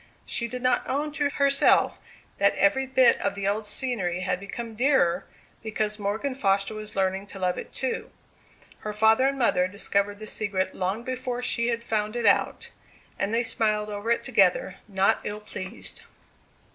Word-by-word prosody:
She 235 - -1
did 250 +1 -6
not 255 - +3
own 290 +3 -1
to 290 -1 0
herself 280 -1 +3 0.4
that - - +4
every 265 -3 +2
bit 260 -2 +5
of - - 0
the 200 -1 -2
old 210 +1 -1
scenery 205 -7 -2
had 180 -1 -1
become 225 +4 -6
dearer 215 -8 +2 0.4
because 215 -1 -2
Morgan 215 +7 -2
Foster 195 -4 +1
was 215 0 -7
learning 190 +1 0
to 200 - -10
love 180 -1 0
it - - -7
too. 260 0 -3 0.7
Her 210 - -5
father 220 +5 +4
and 275 0 -1
mother 185 -8 +3
discovered 200 +1 -1
the 215 - -8
secret 195 -3 -2
long 190 +5 -2
before 250 -1 -3
she 235 -1 +1
had 235 -1 -1
found 215 -1 -1
it 240 -1 -1
out; 200 - +2 0.5
and 200 - 0
they 230 +1 +2
smiled 215 -2 0
over 205 +2 -4
it 235 - +2
together, 195 -5 +2
not 195 -1 +2
ill 210 0 -4
pleased. 190 +1 -6
215 Hz, 170 wpm, -26 LUFS, 200-245 Hz, 0.7 s, bit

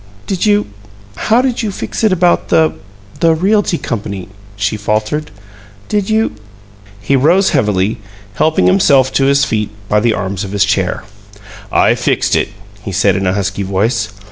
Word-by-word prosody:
"Did 195 +2 -1
you 205 0 +3 0.5
How 230 +3 +2
did 255 -2 -1
you 220 - -2
fix 200 - -5
it 215 - +4
about 180 -1 +2
the 160 -1 +3 0.5
the 165 -1 +3
Realty 195 +1 +1
Company?" 100 - -5 0.3
she 100 +1 -1
faltered. 110 +8 -2 0.6
"Did 205 -1 0
you 220 +1 +1 0.4
" 100 0 -24
He 140 - +3
rose 170 +9 +3
heavily, 105 0 0 0.3
helping 155 +8 +1
himself 140 -9 +4
to 135 - +2
his 140 +1 +3
feet 105 -1 -1 0.2
by 105 - +2
the 115 +1 +1
arms 95 +1 -3
of 95 0 -6
his 100 -1 +3
chair. 95 -2 -1 0.7
"I - - +4
fixed - - 0
it," - - 0 0.3
he 100 - -6
said, 95 +1 +2
in 95 -1 -1
a 90 - +1
husky 100 0 -2
voice. 110 +4 0
115 Hz, 170 wpm, -15 LUFS, -, 0.7 s, it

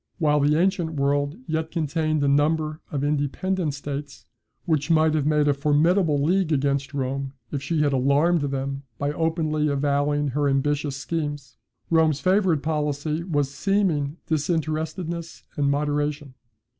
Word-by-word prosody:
While 150 -3 +2
the 150 +2 +3
ancient 175 -3 0
world 145 +2 0
yet 160 0 -2
contained 155 -1 -1
a - - +2
number 155 +2 +1
of 140 -2 -2
independent 150 +3 -1
states, 145 0 -6 0.4
which 155 -3 0
might 160 -1 +4
have 150 -2 +1
made 150 -1 +3
a 145 - +4
formidable 150 +3 +2
league 175 +3 +1
against 140 -1 0
Rome 135 0 -2 0.2
if 140 - -3
she 150 +2 0
had 145 -1 +1
alarmed 145 +6 +3
them 135 -1 -3 0.2
by 145 +3 -1
openly 155 -1 0
avowing 145 0 +1
her 145 +2 0
ambitious 140 +1 0
schemes, 145 0 -4 0.3
Rome's 160 -3 +3
favourite 185 -2 +2
policy 150 +1 -1
was 145 -6 -1
seeming 170 -5 0
disinterestedness 160 +2 -2
and 140 -1 +1
moderation. 145 0 -1
150 Hz, 140 wpm, -24 LUFS, 140-160 Hz, 0.4 s, might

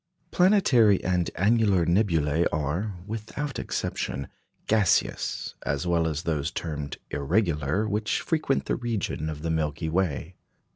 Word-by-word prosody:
Planetary 140 - +4
and 90 -2 +1
annular 100 -2 +3
nebulæ 85 -4 +2
are, 80 +8 -2
without 115 +7 -5
exception, 70 0 -3 0.4
gaseous, 105 -3 +1
as 70 +5 -1
well 85 -2 +2
as 80 +1 -2
those 75 -4 -1
termed 75 -3 -5
"irregular," 85 +3 0
which 105 +1 0
frequent 155 -4 0
the - - 0
region 105 -9 -2
of 75 -1 -6
the 85 - -1
Milky 80 0 -1
Way. 85 -2 -1
85 Hz, 125 wpm, -26 LUFS, 75-110 Hz, 0.4 s, Planetary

